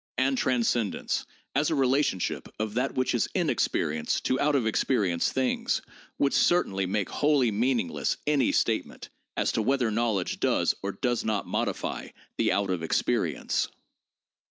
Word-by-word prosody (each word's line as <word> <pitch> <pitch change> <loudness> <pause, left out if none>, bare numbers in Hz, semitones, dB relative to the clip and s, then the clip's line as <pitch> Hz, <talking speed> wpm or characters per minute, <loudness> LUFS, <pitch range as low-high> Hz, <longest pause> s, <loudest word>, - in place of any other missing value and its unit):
And 135 +1 +2
transcendence 120 -4 0 0.3
as 145 +3 +2
a 160 - +1
relationship 135 -8 +1
of 110 -1 -2
that 125 +4 -1
which 130 0 +1
is - - +1
in - - +2
experience 75 +1 0
to 130 - 0
out 150 0 +2
of 130 -5 +2
experience 100 -6 +1
things 130 -1 0 0.3
would 140 - +2
certainly 95 - +2
make 100 0 0
wholly 145 -6 +2
meaningless 115 -3 0
any 145 -3 +2
statement - - -1 0.3
as - - +1
to - - 0
whether 125 0 +1
knowledge 110 -4 0
does - - +2
or 100 - -2
does 120 +4 -1
not 110 -2 -1
modify - - -2 0.3
the - - +2
out 100 -1 +1
of 90 -3 -1
experience. 80 - 0
120 Hz, 150 wpm, -27 LUFS, 100-135 Hz, 0.3 s, And